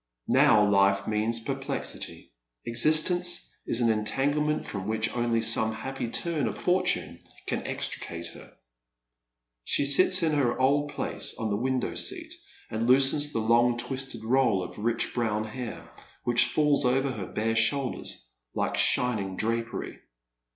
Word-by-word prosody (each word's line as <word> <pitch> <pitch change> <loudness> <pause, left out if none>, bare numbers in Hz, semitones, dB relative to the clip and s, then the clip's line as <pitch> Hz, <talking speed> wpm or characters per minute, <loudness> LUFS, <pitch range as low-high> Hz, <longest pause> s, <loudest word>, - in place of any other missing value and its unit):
Now 105 -1 +5
life 100 -1 +3
means 110 +2 0
perplexity. 135 - -4 0.3
Existence 155 +9 +3
is 120 - +2
an 115 -1 +3
entanglement 145 +8 0
from 100 -1 -6
which 110 +1 -1
only 120 -1 0
some 110 0 +4
happy 130 +2 -5
turn 160 +1 -2
of - - -5
fortune 185 0 0 0.3
can - - -3
extricate 85 0 -4
her. - - -13 1.1
She 140 - +3
sits 185 +6 +5
in 160 - +2
her 135 -5 0
old 145 +3 +2
place - - -2
on 110 -2 -3
the - - +1
window 130 +3 -1
seat, - - -4 0.4
and 110 +1 -2
loosens 135 +3 +3
the 115 - -2
long 120 +2 +3
twisted 125 -1 -5
roll 120 -5 +2
of 90 - -9
rich 115 +2 -1
brown 110 -3 -1
hair, 115 +2 -7 0.4
which 120 -1 +4
falls 150 -2 +1
over 135 +2 +1
her 100 -7 -6
bare 115 +1 -2
shoulders 115 - -1 0.3
like - - -1
shining 105 -6 +1
drapery. 115 +3 -3
120 Hz, 140 wpm, -27 LUFS, 110-140 Hz, 1.1 s, Now